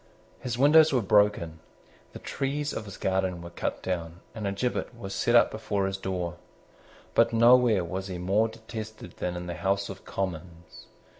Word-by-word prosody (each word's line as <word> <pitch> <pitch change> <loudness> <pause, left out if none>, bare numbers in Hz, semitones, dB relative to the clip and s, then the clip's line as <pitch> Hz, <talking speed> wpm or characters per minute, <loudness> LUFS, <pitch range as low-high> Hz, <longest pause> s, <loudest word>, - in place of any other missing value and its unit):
His 120 -2 -4
windows 155 +4 +6
were 125 -4 +2
broken; 100 -6 +2 0.5
the - - -7
trees 145 +2 -3
of 110 - -5
his 100 -2 -9
garden 95 -2 0
were 85 - -9
cut - - -4
down; 85 -1 -4
and 105 -2 -4
a - - 0
gibbet 120 +3 -2
was 95 -4 -6
set 120 +4 +1
up 120 - +6
before 105 -2 -2
his 95 0 -2
door. 90 -3 -3 0.8
But 115 0 +3
nowhere 115 -3 +5
was 95 +3 -4
he 90 -2 -5
more 100 +5 +2
detested 110 -4 -9
than 90 0 -3
in 90 0 -5
the 85 - -4
House 100 +2 -1
of 95 -1 -9
Commons. 85 -2 -6
100 Hz, 175 wpm, -27 LUFS, 90-115 Hz, 0.8 s, windows